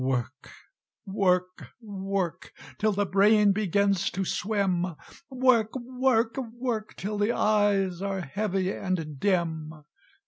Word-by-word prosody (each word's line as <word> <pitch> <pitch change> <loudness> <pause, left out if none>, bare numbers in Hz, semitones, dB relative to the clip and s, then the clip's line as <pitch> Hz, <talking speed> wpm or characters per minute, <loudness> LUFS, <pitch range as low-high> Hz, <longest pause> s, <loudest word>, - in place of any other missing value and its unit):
"Work 130 -2 -2 0.6
work 185 -2 0
work 195 -5 -4 0.3
Till 215 0 +2
the 205 0 0
brain 205 +2 +4
begins 200 -1 +1
to 190 +1 -3
swim; 185 -4 -1 0.3
Work 255 -4 +2
work 250 -2 0
work 235 -2 -4
Till 205 +2 -4
the 210 +3 +2
eyes 200 -4 +2
are 195 -1 -2
heavy 190 +3 -1
and 165 -8 -3
dim! 160 -5 -1
200 Hz, 110 wpm, -27 LUFS, 185-215 Hz, 0.6 s, brain